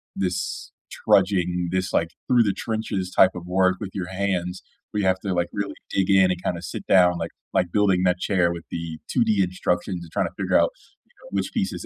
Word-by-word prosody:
this 90 -1 -3 0.2
trudging, 90 -3 +2
this, 95 -1 -1
like, 85 0 +2 0.2
through 125 -2 +5
the 105 - +1
trenches 110 -5 -3
type 95 - +6
of 90 - -7
work 95 0 +2
with 100 -2 -6
your 95 -2 -4
hands, 95 -2 -2 0.3
where 105 - -2
you 95 - +1
have 95 0 +3
to, 95 -3 -2
like, 85 -1 0
really 100 -1 -3 0.2
dig 95 0 0
in 95 -1 +5
and, 90 -1 -2
kind 90 - -1
of, 85 - -9
sit 80 - -6
down 90 -2 +5
like 85 -1 -4 0.2
like 90 -2 +1
building 95 -3 +3
that 90 0 +2
chair 90 -3 +2
with 85 -1 -8
the 85 -2 -5
2D 110 -5 +2
instructions, 90 0 -2
and 80 - -13
trying - - 0
to - - -9
figure - - +2
out, - - +3 0.4
you - - -33
know, - - -13
which - - -2
piece - - 0
is - - -7
95 Hz, 230 wpm, -24 LUFS, 90-100 Hz, 0.4 s, type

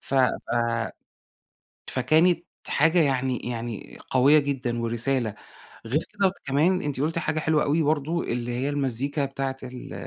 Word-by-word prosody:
ف - - -4
ف 130 -2 +5 1.6
فكانت 160 +7 +3 0.2
حاجة 165 +4 +3
يعني 130 -4 +1
يعني 115 -2 -5
قوية 140 +4 +6
جدًا 130 -4 -2
ورسالة. 115 -1 0 0.5
غير 135 +7 +1
كده 195 -2 +2
كمان 155 +7 +2
أنتِ 145 -3 -3
قُلتِ 160 +3 0
حاجة 155 -1 -1
حلوة 155 -1 +2
أوي 150 +2 +2
برضه، 155 +3 0
اللي 120 0 -3
هي 125 +3 -1
المزيكا 140 0 0
بتاعة 135 -1 -3
ال 125 -1 -8
135 Hz, 135 wpm, -25 LUFS, 125-155 Hz, 1.6 s, قوية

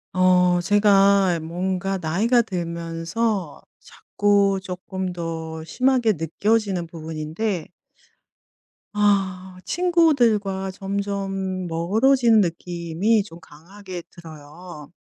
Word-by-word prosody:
어 180 -1 +4
제가 200 -2 +4
뭔가 185 +3 -2
나이가 200 +9 +2
들면서 170 0 -3 0.2
자꾸 200 -1 0
쪼끔 185 0 -5
더 160 -2 -5
심하게 250 +4 +1
느껴지는 195 +3 0
부분인데 160 +3 -4 1.2
아 190 -3 0
친구들과 240 - +2
점점 195 -1 -3
멀어지는 220 +8 +3
느낌이 175 +4 -1
좀 170 -4 -13
강하게 180 +3 -11
들어요. 155 -1 -12
190 Hz, 190 characters per minute, -22 LUFS, 170-205 Hz, 1.2 s, 어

